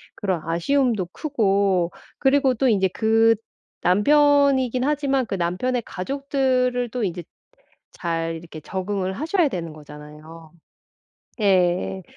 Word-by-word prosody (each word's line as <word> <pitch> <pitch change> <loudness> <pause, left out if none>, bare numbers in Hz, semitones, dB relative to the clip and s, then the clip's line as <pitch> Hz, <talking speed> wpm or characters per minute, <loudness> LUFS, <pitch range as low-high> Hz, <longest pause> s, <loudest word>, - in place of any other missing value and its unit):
그런 190 -5 -2
아쉬움도 195 - 0
크고. 200 - +1 0.3
그리고 270 -1 +3
또 265 +3 +1
이제 195 -4 +3
그 225 +3 +3 0.5
남편이긴 270 - +3
하지만 275 -2 0
그 200 - -4
남편의 195 +8 -1
가족들을 255 +1 -1
또 245 -1 -3
이제 175 -2 -3 0.7
잘 165 -1 -3
이렇게 160 -1 -10
적응을 190 +3 -3
하셔야 325 - +1
되는 170 -7 -5
거잖아요. 155 +2 -13 0.9
예. 185 -1 +1
205 Hz, 245 characters per minute, -22 LUFS, 175-265 Hz, 0.9 s, 그리고